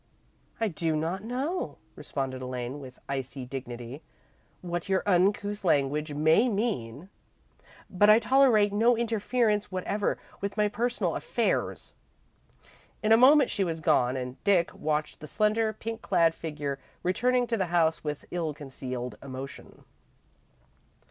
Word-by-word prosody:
"I 225 - +1
do 165 -3 -1
not 165 +6 -2
know," 265 +10 -3 0.2
responded 130 -2 -4
Elaine, 125 +1 -4
with 130 -2 -11
icy 135 -1 -4
dignity, 125 +1 -7 0.6
"what 175 0 -4
your 190 -1 +2
uncouth 205 +2 +1
language 150 -1 +1
may 160 - +4
mean, 190 - -2 0.8
but 205 +3 +3
I 215 - +9
tolerate 230 -3 +4
no 230 +3 +4
interference 225 -2 0
whatever 195 +2 -1 0.2
with 200 +1 -3
my 210 0 +3
personal 240 +4 -1
affairs." - - -1 1.1
In 215 - +2
a - - +9
moment 265 +3 +6
she 200 - 0
was 165 -3 -2
gone, 130 -4 +2
and 125 0 -6
Dick 190 -4 +3
watched 150 0 -2
the 155 - -9
slender, 215 +4 +1
pink 225 +1 -6
clad 165 -1 +3
figure 150 -4 -4 0.2
returning 245 +7 +2
to 235 - -1
the 190 -4 -1
house 165 -2 +2
with 150 -1 -4
ill 165 -4 -2
concealed 130 -3 -6
emotion. 135 0 -9
175 Hz, 135 wpm, -28 LUFS, 140-215 Hz, 1.1 s, I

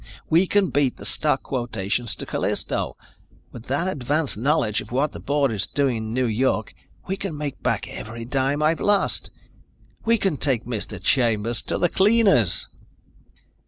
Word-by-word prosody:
We 170 +4 +5
can 195 -5 +2
beat 140 -2 +1
the - - -10
stock 150 -3 0
quotations 120 -3 -2
to - - -6
Callisto. - - -2 0.5
With 120 0 -10
that 145 +7 0
advance 150 -2 -1
knowledge 115 -2 +1
of - - -12
what 140 +4 +1
the - - -8
board 140 -2 +1
is 105 -3 -1
doing 135 -4 0
in 110 0 -4
New 130 +1 +1
York, 115 -1 0 0.3
we 190 - -1
can 190 -6 -5
make 145 -2 -4
back - - 0
every 115 +1 -7
dime 135 +3 0
I've 160 +2 +2
lost. 205 -1 +2 0.7
We 230 +1 +3
can 195 -7 0
take 130 -5 0
Mr. 115 -4 -4
Chambers 115 -3 +2
to - - 0
the 175 - +3
cleaners!" 195 - +3
135 Hz, 160 wpm, -23 LUFS, 115-155 Hz, 0.7 s, We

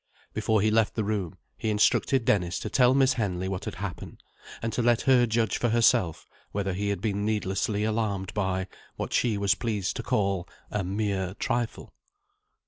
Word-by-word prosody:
Before 110 -2 +1
he 110 +1 +2
left 110 -1 +2
the 110 - 0
room, 100 -5 -2 0.2
he 110 - -1
instructed 110 +4 +2
Dennis 90 -5 +1
to - - -5
tell 125 -1 +4
Miss 135 -1 +4
Henley 95 -6 -2
what 95 -1 -4
had - - -5
happened, 95 -3 -7 0.4
and 115 0 -3
to - - 0
let 120 0 +3
her 125 -3 +4
judge 110 -2 0
for 120 - +1
herself 110 -8 +2 0.3
whether 95 -2 -1
he 100 +2 -2
had 100 -3 -2
been 100 -2 -1
needlessly 105 0 0
alarmed 105 -4 -1
by, 95 -2 -1 0.3
what - - -4
she 115 -4 +2
was 100 0 +3
pleased 105 -5 -2
to - - -2
call, 95 -3 0 0.2
"a 105 -2 -1
mere 95 -1 -2
trifle." 120 0 -3
105 Hz, 180 wpm, -27 LUFS, 95-115 Hz, 0.4 s, tell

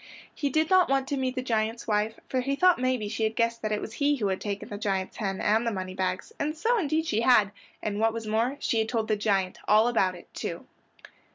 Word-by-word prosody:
He 285 - -1
did 315 +4 +1
not 370 -4 +5
want 270 -1 +1
to 285 - 0
meet 260 -1 -1
the 255 - -2
giant's 225 -1 -1
wife, 215 +1 0
for 255 - 0
he 275 +2 -1
thought 365 +1 +4
maybe 255 -4 0
she 225 +2 -4
had 220 0 0
guessed 230 0 0
that 215 - -2
it 210 - 0
was 215 - -7
he 285 +3 +2
who 210 -7 -1
had 190 - -2
taken 200 -1 -4
the 205 - -5
giant's 195 -3 -2
hen, 195 -4 -2
and 220 +3 +2
the - - +1
moneybags, 185 -1 -3
and 305 +2 -2
so 460 +6 +2
indeed 315 -2 0
she 225 -8 0
had, 225 -5 +5 0.3
and 205 -1 -2
what 225 +1 +3
was 225 0 -5
more 230 +6 0
she 230 - 0
had 220 0 0
told 225 -2 -1
the 215 - +2
giant 195 -3 0
all 215 +2 +5
about 195 -6 +2
it, 175 - -15
too. - - -5
225 Hz, 250 wpm, -27 LUFS, 210-260 Hz, 0.3 s, not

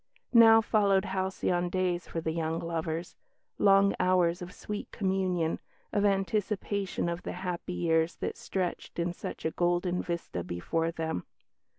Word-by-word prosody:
Now 225 -1 +8
followed 200 -3 +3
halcyon 185 -2 -1
days 180 -1 -1
for 165 - -3
the 160 - -1
young 160 0 -1
lovers 165 0 -3 0.4
long 195 0 +5
hours 180 -1 +3
of 180 0 -6
sweet 210 +2 -6
communion, 185 -4 0 0.3
of 205 -1 +2
anticipation 200 -1 0
of 170 0 -2
the - - -5
happy 180 0 -4
years 165 -1 +1
that - - -3
stretched 185 -2 -3
in 170 0 0
such - - -7
a 160 - +1
golden 175 +1 +1
vista 170 - -4
before 130 - -1
them. 160 - -3
180 Hz, 145 wpm, -30 LUFS, 170-195 Hz, 0.4 s, Now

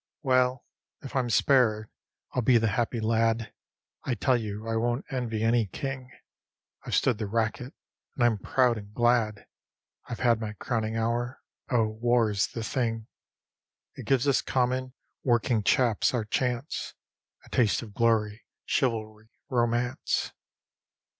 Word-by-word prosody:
Well, 130 -1 +2 0.4
if 135 - -8
I'm 125 -2 +1
spared 115 -3 +3 0.5
I'll 125 - +1
be 120 +1 +5
the 115 -1 +2
happy 115 +3 -1
lad. 115 0 +1 0.5
I 125 - -1
tell 130 +2 +2
you 110 -1 -4
I 115 - -1
won't 120 +3 0
envy 115 -4 -2
any 115 -1 +3
king. 130 +5 -5 0.7
I've - - -2
stood 125 -5 +2
the 105 - -2
racket, 115 +4 -2 0.4
and 125 - 0
I'm 115 -3 +3
proud 125 +1 +2
and 100 0 -13
glad; 120 -3 +2 0.6
I've 120 - -5
had 120 -3 +3
my 105 -1 -4
crowning 110 +1 -2
hour. 120 +2 -2 0.3
Oh, 120 -3 +3
War's 110 -2 +1
the 115 - -6
thing! 115 -1 -2 0.8
It - - -10
gives 135 0 +2
us 140 - +3
common, 130 0 -1 0.3
working 120 -2 +2
chaps 120 +1 +2
our 115 -3 -1
chance, 125 +5 -2 0.5
A - - -17
taste 120 -3 +2
of 105 -3 -11
glory, 110 -1 +1 0.2
chivalry, 110 -3 -1 0.2
romance. 120 0 0
115 Hz, 140 wpm, -28 LUFS, 110-125 Hz, 0.8 s, be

